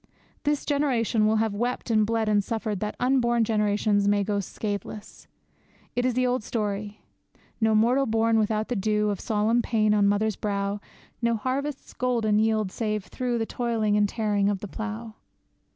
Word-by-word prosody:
This 295 Hz, 0 st, 0 dB
generation 245 Hz, -7 st, +1 dB
will 220 Hz, -, +3 dB
have 220 Hz, -1 st, +1 dB
wept 240 Hz, +3 st, -2 dB
and 215 Hz, -1 st, +3 dB
bled 225 Hz, -1 st, 0 dB
and 205 Hz, -1 st, +3 dB
suffered 215 Hz, -2 st, -3 dB
that 210 Hz, +1 st, -3 dB
unborn 240 Hz, -2 st, +2 dB
generations 210 Hz, -1 st, +1 dB
may 205 Hz, 0 st, +3 dB
go 205 Hz, 0 st, -1 dB
scatheless. 205 Hz, +1 st, -6 dB, 0.7 s
It 245 Hz, +1 st, +1 dB
is 250 Hz, -, -1 dB
the 255 Hz, 0 st, +2 dB
old 250 Hz, -2 st, 0 dB
story: 210 Hz, -2 st, -3 dB, 0.6 s
No 220 Hz, 0 st, +3 dB
mortal 245 Hz, +5 st, +3 dB
born 225 Hz, 0 st, +2 dB
without 215 Hz, 0 st, 0 dB
the 245 Hz, -, -1 dB
dew 210 Hz, +1 st, +1 dB
Of 200 Hz, -, -4 dB
solemn 220 Hz, +2 st, +1 dB
pain 215 Hz, -3 st, +2 dB
on 205 Hz, -1 st, +4 dB
mother's 205 Hz, +1 st, +1 dB
brow; 200 Hz, -1 st, -2 dB, 0.4 s
No 235 Hz, 0 st, +2 dB
harvest's 265 Hz, +5 st, -3 dB
golden 230 Hz, -4 st, +1 dB
yield 215 Hz, -3 st, +1 dB
save 215 Hz, -2 st, -2 dB
through 245 Hz, -2 st, -2 dB
The 225 Hz, -, -1 dB
toil 235 Hz, -1 st, -2 dB
and 210 Hz, -1 st, +3 dB
tearing 205 Hz, -3 st, +1 dB
of 205 Hz, -, 0 dB
the 205 Hz, -, -5 dB
plough. 220 Hz, +2 st, -6 dB
220 Hz, 170 wpm, -26 LUFS, 210-235 Hz, 0.7 s, on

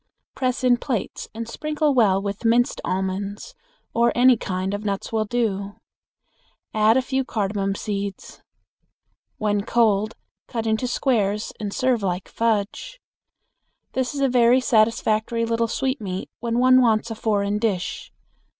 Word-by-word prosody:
Press 255 Hz, 0 st, -1 dB
in 245 Hz, -1 st, +4 dB
plates 240 Hz, -4 st, -3 dB
and 230 Hz, +1 st, -6 dB
sprinkle 305 Hz, +4 st, -1 dB
well 210 Hz, -7 st, +4 dB
with 200 Hz, +2 st, -5 dB
minced 235 Hz, +1 st, +2 dB
almonds, 195 Hz, -, -3 dB, 0.4 s
or 235 Hz, +1 st, +3 dB
any 250 Hz, +1 st, +6 dB
kind 190 Hz, -2 st, -3 dB
of 205 Hz, +1 st, -4 dB
nuts 200 Hz, +1 st, -3 dB
will 220 Hz, -1 st, +1 dB
do. 215 Hz, -3 st, -1 dB
Also 200 Hz, +1 st, -10 dB, 1.0 s
add 215 Hz, +2 st, +4 dB
a 260 Hz, -, +2 dB
few 265 Hz, +1 st, -1 dB
cardamon 200 Hz, -4 st, -2 dB
seeds. 200 Hz, -2 st, -5 dB, 1.0 s
When 205 Hz, -1 st, 0 dB
cold, 215 Hz, -1 st, +1 dB, 0.3 s
cut 230 Hz, -2 st, -3 dB
into 220 Hz, +3 st, 0 dB
squares 215 Hz, -5 st, 0 dB
and 210 Hz, -2 st, -3 dB
serve 255 Hz, 0 st, +1 dB
like 180 Hz, -1 st, -2 dB
fudge. 230 Hz, -, -1 dB, 0.9 s
This 260 Hz, +2 st, -2 dB
is 280 Hz, -, -2 dB
a 275 Hz, -, +4 dB
very 245 Hz, 0 st, +4 dB
satisfactory 225 Hz, -1 st, +1 dB
little 230 Hz, 0 st, 0 dB
sweetmeat 220 Hz, -7 st, -3 dB
when 235 Hz, 0 st, -2 dB
one 255 Hz, +1 st, +6 dB
wants 225 Hz, -1 st, +2 dB
a -, -, -1 dB
foreign 210 Hz, -2 st, 0 dB
dish. 200 Hz, -5 st, -2 dB
225 Hz, 140 wpm, -23 LUFS, 200-245 Hz, 1.0 s, any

